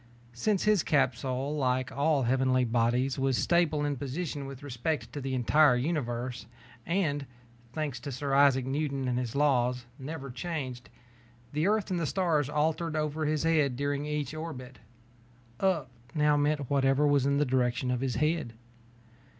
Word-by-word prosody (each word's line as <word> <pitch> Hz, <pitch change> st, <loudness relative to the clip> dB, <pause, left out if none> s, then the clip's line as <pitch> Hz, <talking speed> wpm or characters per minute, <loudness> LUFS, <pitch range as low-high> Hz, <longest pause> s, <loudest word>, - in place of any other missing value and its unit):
Since 195 Hz, -, 0 dB
his 210 Hz, -4 st, +4 dB
capsule, 135 Hz, 0 st, 0 dB
like 130 Hz, -3 st, 0 dB
all 145 Hz, 0 st, +1 dB
heavenly 130 Hz, +1 st, +2 dB
bodies, 120 Hz, +3 st, +1 dB
was 135 Hz, -2 st, +1 dB
stable 160 Hz, -4 st, +2 dB
in 145 Hz, -1 st, -1 dB
position 145 Hz, +1 st, -4 dB
with 135 Hz, 0 st, -9 dB
respect 145 Hz, +3 st, -3 dB
to 145 Hz, -, -4 dB
the 135 Hz, 0 st, -2 dB
entire 130 Hz, +2 st, +4 dB
universe 125 Hz, -3 st, -2 dB, 0.4 s
and, 155 Hz, -6 st, 0 dB, 0.5 s
thanks 150 Hz, -5 st, -3 dB
to 140 Hz, +3 st, -6 dB
Sir 135 Hz, +2 st, -3 dB
Isaac 135 Hz, -2 st, +5 dB
Newton 135 Hz, -1 st, -2 dB
and 125 Hz, 0 st, 0 dB
his 125 Hz, -1 st, -4 dB
laws, 125 Hz, -4 st, +2 dB
never 135 Hz, -1 st, -6 dB
changed, 130 Hz, -5 st, -5 dB, 0.6 s
the 155 Hz, +4 st, +1 dB
Earth 215 Hz, -2 st, +1 dB
and 180 Hz, -, 0 dB
the 165 Hz, -, -1 dB
stars 160 Hz, -5 st, +1 dB
alternated 155 Hz, +2 st, 0 dB
over 155 Hz, +1 st, -1 dB
his 155 Hz, 0 st, 0 dB
head 155 Hz, -5 st, +2 dB
during 145 Hz, +2 st, -2 dB
each 150 Hz, -2 st, -2 dB
orbit. 135 Hz, -6 st, -7 dB, 0.8 s
"Up" 165 Hz, -9 st, +1 dB, 0.2 s
now 150 Hz, -1 st, +3 dB
meant 145 Hz, -1 st, +1 dB
whatever 135 Hz, +1 st, +2 dB
was 145 Hz, -2 st, +3 dB
in 140 Hz, 0 st, +2 dB
the 150 Hz, -, +2 dB
direction 125 Hz, -1 st, 0 dB
of 125 Hz, 0 st, -1 dB
his 130 Hz, -2 st, -1 dB
head. 155 Hz, -5 st, 0 dB
140 Hz, 160 wpm, -29 LUFS, 130-155 Hz, 0.8 s, Isaac